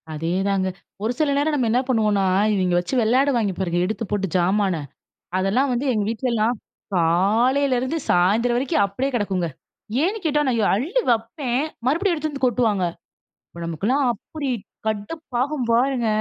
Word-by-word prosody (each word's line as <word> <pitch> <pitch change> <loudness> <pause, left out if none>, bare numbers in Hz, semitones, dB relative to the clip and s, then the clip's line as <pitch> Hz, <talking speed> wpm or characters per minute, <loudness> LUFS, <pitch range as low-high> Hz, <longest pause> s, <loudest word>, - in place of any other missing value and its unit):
அதேதாங்க. 190 +5 0 0.4
ஒரு 220 - +1
சில 300 -2 +2
நேரம் 300 +2 +1
நம்ம 255 -5 +1
என்ன 245 +2 +3
பண்ணுவோனா, 215 -5 +2 0.3
இவிங்க 185 -3 +1
வச்சு 175 - -5
விளையாடுவாய்ங்க 240 -3 +2
பாருங்க, 175 -2 0
எடுத்து 220 +4 -3
போட்டு 200 -2 0
ஜாமான. 190 +1 +2 0.6
அதெல்லாம் 205 +9 +1
வந்து 245 +4 -1
எங்க 210 -2 0
வீட்லலாம் 230 0 0 0.4
காலையிலருந்து 245 - +2
சாயந்தரம் 220 +7 +3
வரைக்கும் 250 -5 +1
அப்டியே 225 +8 -2
கிடக்குங்க. 195 -6 0 0.6
ஏன்னு 395 +6 0
கேட்டா! 295 -1 +2
நான் 240 -3 +1
எ - - +2
அள்ளி 315 - 0
வைப்பேன், 240 +3 0 0.2
மறுபடியும் 340 +6 +2
எடுத்து 310 0 -3
வந்து 275 -2 -1
கொட்டுவாங்க. 225 -5 +1 0.7
அப்ப 170 - -10
நமக்கெல்லாம் 210 - 0
அப்டி 275 +5 -5 0.4
கடுப்பாகும் 250 +4 -2
பாருங்க. 245 0 +2
235 Hz, 140 wpm, -22 LUFS, 195-270 Hz, 0.7 s, என்ன